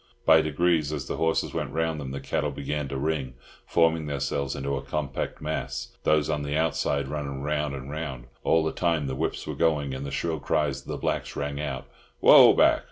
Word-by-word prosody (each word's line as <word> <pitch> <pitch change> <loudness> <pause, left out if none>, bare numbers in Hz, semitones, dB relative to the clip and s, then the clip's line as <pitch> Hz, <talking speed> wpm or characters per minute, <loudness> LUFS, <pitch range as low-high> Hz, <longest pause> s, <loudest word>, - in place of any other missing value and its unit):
By 80 - +7
degrees, 80 0 +1
as 70 -4 -3
the - - -4
horses 80 0 0
went - - -3
round 80 -1 0
them, 70 - -5
the 70 +1 -4
cattle 75 +2 -1
began 70 +1 -3
to 70 0 -4
"ring," 70 -3 -2 0.3
forming 80 -2 +2
themselves 70 -1 -2
into 70 +1 -2
a - - -3
compact 70 -3 -4
mass, 80 +1 -3 0.2
those 75 -2 +3
on 75 -2 -1
the 70 +1 -2
outside 70 -3 0
running 70 -1 -4
round 75 -1 -1
and 65 -1 -7
round. 70 -5 -5 0.2
All 80 - +3
the 80 - 0
time 85 -4 0
the 65 - -3
whips - - -2
were - - -4
going, 75 -4 +1
and 65 +1 -5
the 70 - -4
shrill 80 +2 -2
cries 70 -2 0
of - - -21
the - - -3
blacks - - -2
rang 70 0 -3
out, 70 -2 -4 0.3
"Whoa - - +9
back! - - +5
75 Hz, 210 wpm, -26 LUFS, 70-80 Hz, 0.3 s, Whoa